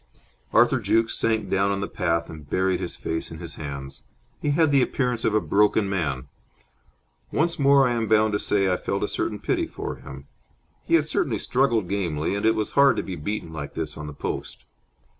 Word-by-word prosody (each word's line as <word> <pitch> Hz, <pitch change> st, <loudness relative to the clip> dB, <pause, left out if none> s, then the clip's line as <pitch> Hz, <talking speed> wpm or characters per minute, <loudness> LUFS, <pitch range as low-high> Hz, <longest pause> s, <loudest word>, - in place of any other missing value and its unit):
Arthur -, -, +4 dB
Jukes 115 Hz, 0 st, +1 dB
sank 110 Hz, -3 st, 0 dB
down 100 Hz, +1 st, +1 dB
on 100 Hz, 0 st, -1 dB
the 100 Hz, -, -2 dB
path 85 Hz, -1 st, -1 dB
and 75 Hz, -3 st, -11 dB
buried 95 Hz, -1 st, +1 dB
his 90 Hz, -2 st, -4 dB
face 80 Hz, 0 st, -3 dB
in 80 Hz, -, -8 dB
his 85 Hz, 0 st, -5 dB
hands. 70 Hz, -3 st, -6 dB, 0.4 s
He 150 Hz, -, 0 dB
had 155 Hz, +1 st, +3 dB
the 140 Hz, -2 st, +5 dB
appearance 125 Hz, -2 st, 0 dB
of 110 Hz, -, +1 dB
a -, -, +5 dB
broken 105 Hz, 0 st, +2 dB
man. 75 Hz, -9 st, -2 dB, 1.0 s
Once 165 Hz, 0 st, +1 dB
more, 140 Hz, -1 st, +5 dB
I -, -, 0 dB
am 115 Hz, -2 st, -1 dB
bound 110 Hz, 0 st, +3 dB
to 105 Hz, -, +1 dB
say, 100 Hz, -2 st, +2 dB
I 90 Hz, -1 st, +2 dB
felt -, -, -2 dB
a -, -, +1 dB
certain -, -, -2 dB
pity -, -, -1 dB
for -, -, -6 dB
him. 70 Hz, 0 st, -10 dB, 0.6 s
He -, -, +2 dB
had -, -, +3 dB
certainly -, -, 0 dB
struggled 120 Hz, -7 st, +1 dB
gamely, 85 Hz, -6 st, -1 dB
and 100 Hz, +2 st, 0 dB
it 110 Hz, -, +4 dB
was 110 Hz, -, -2 dB
hard 140 Hz, -2 st, +5 dB
to -, -, -1 dB
be 95 Hz, -, -5 dB
beaten 85 Hz, 0 st, -4 dB
like 75 Hz, -3 st, -6 dB
this 75 Hz, -2 st, -4 dB
on 75 Hz, 0 st, -7 dB
the 75 Hz, -, -7 dB
post. -, -, -5 dB
100 Hz, 210 wpm, -24 LUFS, 80-115 Hz, 1.0 s, the